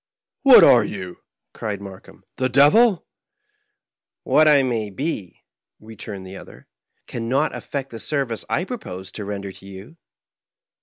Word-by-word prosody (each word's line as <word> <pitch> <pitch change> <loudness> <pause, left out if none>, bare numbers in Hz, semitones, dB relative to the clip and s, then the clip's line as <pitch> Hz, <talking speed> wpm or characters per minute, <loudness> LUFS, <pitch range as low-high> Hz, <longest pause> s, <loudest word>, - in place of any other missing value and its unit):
" - - -71
What 270 -2 +8
are 120 -3 +6
you? 95 -4 -7 0.2
" - - -62
cried 105 -3 -5
Markheim; 95 -2 -13
" - - -57
the 130 0 0
devil? 170 - +4 0.4
" 420 0 -49
" - - -70 0.3
What 155 0 +3
I 145 -3 +5
may 115 -5 -2
be," 105 - -5 0.4
returned 105 -3 -9
the 95 +1 -10
other, - - -14 0.2
" - - -51
can 115 -1 -6
not 140 +5 +1
af - - -8
fect 140 -1 -5
the 115 - -8
service 135 -7 -2
I 175 - 0
propose 95 - -8
to 105 - -7
render 100 -1 -5
you." 95 - -13
115 Hz, 170 wpm, -21 LUFS, 100-150 Hz, 0.4 s, What